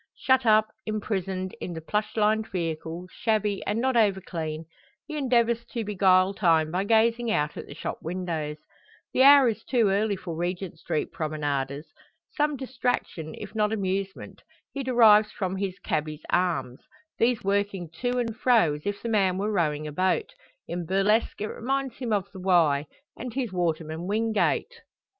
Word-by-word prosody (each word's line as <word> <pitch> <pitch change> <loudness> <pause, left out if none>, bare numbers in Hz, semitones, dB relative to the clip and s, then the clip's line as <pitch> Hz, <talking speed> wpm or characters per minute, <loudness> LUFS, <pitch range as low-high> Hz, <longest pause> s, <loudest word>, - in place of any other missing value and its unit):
Shut 260 -2 +2
up, 215 0 +5 0.2
imprisoned, 190 -3 -2
in 175 - -4
the 165 - -5
plush 210 +7 -2
lined 215 +1 +2
vehicle, 165 0 -4
shabby, 215 -3 0
and 210 +2 0
not 260 +1 +1
over 205 -4 +3
clean, 160 -3 -5 0.4
he 310 - -7
endeavours 235 -4 +2
to 235 -2 -2
beguile 190 -2 +3
time 165 -5 +2
by 185 +3 -1
gazing 230 +2 +3
out 150 -8 0
at - - -7
the 145 - -10
shop - - -5
windows. 165 -3 -3 0.6
The - - +3
hour 280 -1 +8
is 225 -1 -2
too 235 -6 +2
early 200 +1 +1
for 180 -3 -6
Regent 175 0 -4
Street 155 - -2
promenaders. 145 -2 -2 0.5
Some 295 -1 +1
distraction, 245 - -3
if - - -8
not 210 -1 +1
amusement, 195 -2 -3 0.3
he 275 - -3
derives 220 -5 +5
from 190 -2 -3
his 190 -1 -3
"cabby's" 155 0 -3
arms; 170 -8 0 0.4
these 235 0 +2
working 200 -2 0
to 245 0 0
and 230 -3 -1
fro 230 -10 +3
as 150 +5 -7
if 205 0 -3
the 235 - -2
man 195 -4 +2
were 205 +2 -1
rowing 155 -6 0
a 150 - -5
boat. 185 - 0 0.3
In 175 0 -3
burlesque 205 +5 +1
it - - 0
reminds 270 +2 -3
him 245 -4 -4
of 200 -3 +1
the 190 - -10
Wye, 160 -6 +3 0.3
and 245 -1 -7
his 250 -7 -2
waterman 165 -1 -2
Wingate! 220 - 0
200 Hz, 165 wpm, -26 LUFS, 170-225 Hz, 0.6 s, hour